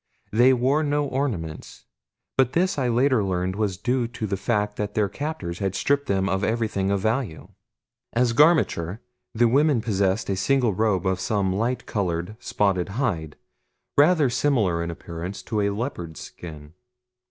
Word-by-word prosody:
They 120 +4 +5
wore 130 +4 +2
no 145 -1 +1
ornaments; 115 - -4 0.5
but 130 -2 +2
this 180 -2 +1
I 130 - +1
later 125 -1 +3
learned 95 -1 -1
was 105 -3 -1
due 120 +3 0
to 115 -2 -5
the 100 -1 -1
fact 105 +1 -1
that 105 0 -3
their 105 -2 +2
captors 100 - -5
had 95 -1 -1
stripped 140 +5 +1
them 95 -1 +1
of 95 0 0
everything 110 -4 0
of 100 -1 +1
value. 110 -5 -2 0.6
As 120 0 +2
garmenture 115 - +3 0.4
the 120 +1 +4
women 140 +2 +3
possessed 100 -2 0
a - - +1
single 120 +3 +2
robe 100 -2 +1
of 95 0 +1
some 95 -1 0
light 120 +5 -1
colored, 90 -1 -2
spotted 100 -6 0
hide, 85 - -1 0.6
rather 150 0 +5
similar 115 -10 +1
in 85 - -4
appearance 85 +2 -6
to 105 -2 -1
a 100 - +2
leopard's 100 - -4
skin. 75 -3 -10
105 Hz, 160 wpm, -24 LUFS, 95-130 Hz, 0.6 s, They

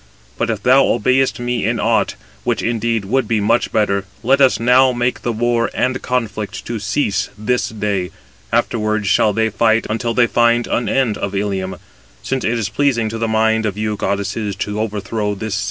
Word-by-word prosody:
But - - -1
if 110 -3 -2
thou 130 +2 +6
obeyest 130 +4 +1
me 120 -2 -2
in - - 0
aught, - - +1 0.3
which - - -1
indeed 115 -2 -1
would 125 +3 0
be 110 -1 +1
much 115 +4 +1
better, 100 -2 +1 0.2
let 135 +4 +3
us 130 -2 +4
now 125 +2 +5
make 120 0 -1
the 120 - -1
war 115 +1 0
and 130 +1 0
conflict 110 -5 -3
to 115 -1 -4
cease 105 +1 -1
this 120 +4 0
day, 100 -4 -2 0.4
afterwards 110 -2 0
shall 105 +2 +3
they 110 +1 0
fight 110 +2 +2
until 115 +1 -2
they 120 - +5
find 120 0 +2
an 120 - -1
end 125 -6 +1
of 100 0 -3
Ilium; 95 -2 -2 0.5
since 135 -1 -2
it 115 +1 0
is 110 -3 -1
pleasing 115 -1 +1
to 115 +1 -5
the 115 - 0
mind 110 0 +2
of 100 -1 -4
you 105 0 -1
goddesses 100 +1 -2
to 105 +1 -3
overthrow 105 0 -2
this 110 +1 -4
city." 100 - 0
110 Hz, 190 wpm, -18 LUFS, 105-120 Hz, 0.5 s, thou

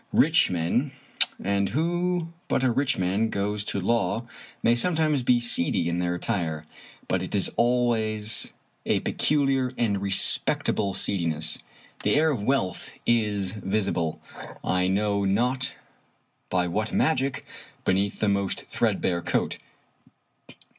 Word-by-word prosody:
Rich - - +4
men 90 - 0 0.2
— - - -29 0.2
^and 100 0 0
who 175 - 0 0.2
but - - +1
a 130 - +3
rich 135 +3 +1
man 95 +5 +1
goes 105 +1 -1
to 100 - -2
law 115 +2 0 0.2
— - - -23
may 115 - +5
sometimes 155 +1 +2
be 120 0 +3
seedy 85 -7 +1
in 85 +1 -1
their 90 0 0
attire, 85 -6 -2 0.4
but 95 - 0
it 95 - -3
is 100 - +2
always 115 -3 +1 0.3
a - - +1
peculiar 135 -3 +1
and 100 -4 0
respectable 100 0 +1
seediness. 80 -5 0 0.4
The - - +2
air 155 +2 +4
of 125 -8 -2
wealth 115 -8 -1 0.2
is 105 -5 +1
visible, 95 -5 -1 0.4
I 90 0 +1
know 100 +1 +1
not 125 +7 +1 0.8
by 90 -1 +1
what 105 +5 -1
magic, 135 -4 +1 0.4
beneath 100 +2 +1
the 110 - +2
most 100 -1 0
threadbare 85 -1 0
coat. - - -1
105 Hz, 135 wpm, -26 LUFS, 95-125 Hz, 0.8 s, may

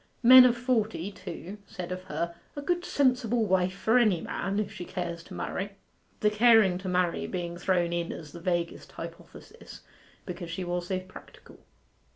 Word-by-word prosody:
Men 255 +1 +10
of 245 -1 +3
forty, 225 -7 -1
too, 195 +1 -8
said 180 -1 -7
of 185 0 -5
her, 170 +2 -3 0.2
'a 285 - -4
good 350 +2 0
sensible 250 -7 +1
wife 185 -1 +1
for 225 +5 +3
any 210 -8 +3
man, 195 +4 -3
if 205 -1 -2
she 180 - -6
cares 175 -1 -5
to - - -10
marry,' 200 +2 -4 0.5
the 210 - +3
caring 215 -4 +5
to 185 0 -5
marry 180 -1 0
being 175 -2 -4
thrown 175 -1 0
in 170 -1 -2
as 150 -3 -8
the 170 - -9
vaguest 175 -1 -2
hypothesis, - - -11 0.4
because 175 -2 -6
she 175 +3 -4
was 175 0 -3
so 185 -1 -1
practical. 185 0 -15
185 Hz, 175 wpm, -28 LUFS, 175-220 Hz, 0.5 s, Men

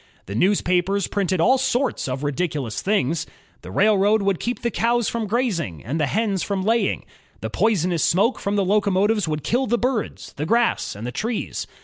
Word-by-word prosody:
The 100 - -7
newspapers 185 - +2
printed 190 -3 -1
all 255 +10 +4
sorts 260 - 0
of 130 +2 -3
ridiculous 145 - -2
things. 165 -5 0 0.3
The - - -10
railroad 205 0 +3
would 195 -3 +1
keep 245 +1 -3
the 235 - 0
cows 235 +2 +1
from 230 -2 -2
grazing 190 - -1
and 145 +8 -2
the 150 - +1
hens 200 - 0
from 195 -2 -2
laying. 225 +3 +1 0.4
The - - -4
poisonous 180 -6 +1
smoke 205 +8 +2
from 200 +1 -2
the 200 -2 +1
locomotives 205 +1 +2
would 150 -1 -2
kill 255 +3 0
the 240 +2 +2
birds, 245 -2 -2
the 150 - -2
grass, 235 - +1
and 105 +3 -7
the 125 - -3
trees. 225 - -3
200 Hz, 185 wpm, -22 LUFS, 170-230 Hz, 0.4 s, all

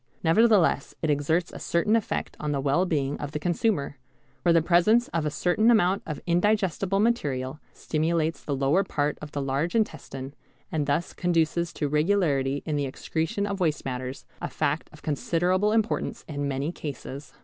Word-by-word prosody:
Nevertheless 195 -3 +3
it 155 - +2
exerts 160 +4 +1
a - - -7
certain 170 +6 +1
effect 225 - -2
on 150 - -2
the 140 - 0
well 145 +7 +2
being 145 -4 -1
of 145 0 -5
the 150 - -2
consumer, 170 - 0 0.4
for 175 - +3
the 165 - +6
presence 185 +8 +4
of 165 -2 -1
a - - +1
certain 180 +9 +2
amount 200 -4 +4
of 155 -2 -4
indigestible 195 +1 +1
material 145 - 0
stimulates 160 +1 -1
the 145 - -2
lower 140 +8 +2
part 150 -5 -1
of 150 -1 -8
the 145 - -2
large 140 +7 -1
intestine 140 -10 -2 0.4
and 150 -3 -1
thus 150 +4 0
conduces 170 -1 +1
to 150 - -1
regularity 150 -4 +1
in 150 -2 -1
the 140 -1 0
excretion 160 +8 -2
of 200 -1 -3
waste 160 -4 0
matters, 130 0 -5 0.2
a - - -3
fact 150 +3 -1
of 155 - -16
considerable 175 +7 +1
importance 220 0 -1
in 145 -2 -3
many 140 +3 -2
cases. 145 -3 -7
160 Hz, 170 wpm, -26 LUFS, 145-180 Hz, 0.4 s, the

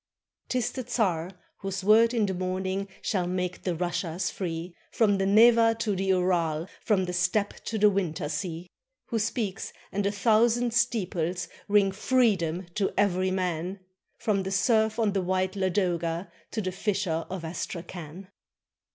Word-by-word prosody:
'T 255 - 0
is 240 -2 0
the 260 - -5
czar, 180 -9 0 0.3
whose 195 0 -4
word 225 +3 +6
in 230 -4 +2
the 190 - -1
morning 185 +2 -2 0.2
Shall 185 -5 0
make 180 0 -2
the 180 -2 -1
Russias 175 0 -2
free. 170 -1 -5 0.2
From 205 -4 +2
the 195 - +1
Neva 225 +2 +6
to 215 -3 -1
the 190 +1 -1
Ural, 175 -4 +1 0.2
From 195 -4 +2
the 180 - -4
Steppe 200 +3 0
to 225 - -2
the 210 0 +6
winter 180 -5 -1
sea; 170 +2 -4 0.4
Who 230 - 0
speaks, 210 -2 -2 0.2
and 205 - -1
a - - +1
thousand 230 +3 +3
steeples 185 -7 0 0.2
Ring 200 -1 +4
freedom 195 -6 +1
to 195 0 0
every 185 -2 +2
man, 185 0 -2 0.2
— - - -50
From 205 -3 +2
the 190 - -3
serf 220 +2 +2
on 220 -4 +1
the 195 - +1
white 185 +1 0
Ladoga 180 -3 -1 0.2
To 220 - -3
the 185 - -2
fisher 190 -4 -1
of 180 -3 -5
Astrakhan. 175 +1 -6
190 Hz, 160 wpm, -27 LUFS, 180-210 Hz, 0.4 s, word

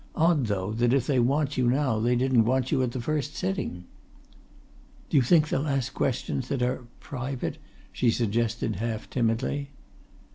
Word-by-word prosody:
"Odd, 160 -6 +3
though, 100 -1 -1
that 120 +2 +2
if 135 -3 +2
they 135 -2 +2
want 140 +4 +1
you 125 -1 +3
now 130 -4 +1
they 120 +3 +2
didn't 125 -1 +3
want 130 +2 +1
you 140 -4 +2
at 125 -2 0
the 130 - -4
first 150 +3 -2
sitting!" 185 - -3 1.3
"Do - - +4
you - - +7
think 155 +4 +4
they'll 140 +3 0
ask 135 -2 -1
questions 130 0 -1
that 130 -2 -1
are 125 0 -2
private?" 130 -1 -4 0.3
she 120 - +2
suggested 115 -3 0
half 110 0 -3
timidly. 130 +4 0
130 Hz, 170 wpm, -27 LUFS, 120-140 Hz, 1.3 s, you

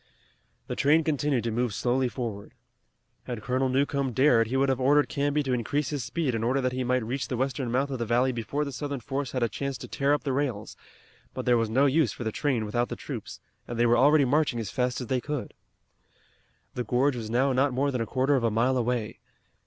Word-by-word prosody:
The - - -4
train 155 +3 +3
continued 145 -4 0
to 115 - -1
move 120 -2 -1
slowly 125 +2 +1
forward. 115 -5 -6 0.7
Had 120 -4 -5
Colonel 130 +2 0
Newcomb 135 0 0
dared 120 -3 +4
he 130 +4 -1
would 135 +1 +3
have 130 -1 +1
ordered 145 +3 +4
Canby 145 +1 0
to 130 -2 -1
increase 140 +5 -1
his 145 -4 -2
speed 145 0 -1
in 115 -1 -2
order 130 +4 +1
that 130 -1 0
he 130 0 -2
might 125 -1 0
reach 130 +4 -3
the 125 - -3
western 130 -1 -2
mouth 135 +3 0
of 130 - -3
the 115 - -1
valley 125 +3 +2
before 130 +5 -2
the 140 - -5
Southern 140 +1 -4
force 135 +1 -4
had 130 -2 0
a - - +3
chance 135 +5 -4
to - - -9
tear 140 +1 0
up - - -5
the 135 - -1
rails, 130 -7 -2 0.6
but - - -4
there 125 - +4
was 115 -2 +1
no 130 +6 +3
use 140 -4 +3
for 120 - -7
the 110 - -2
train 125 -3 -1
without 120 +3 -1
the - - -4
troops - - -7 0.3
and 120 - -5
they 120 - +3
were 120 0 +4
already 145 +3 +5
marching 140 -2 +1
as 110 -4 -4
fast 125 0 -1
as - - -4
they 125 +1 -1
could. 145 -2 -4 1.2
The 125 - -3
gorge 130 +3 +1
was 115 -3 -5
now 130 +4 +2
not 135 +2 +2
more 140 +3 0
than 125 -3 -2
a 115 - -2
quarter 135 +4 +1
of 130 - 0
a 115 - +3
mile 120 +4 +1
away. 120 -2 -2
130 Hz, 240 wpm, -27 LUFS, 120-140 Hz, 1.2 s, already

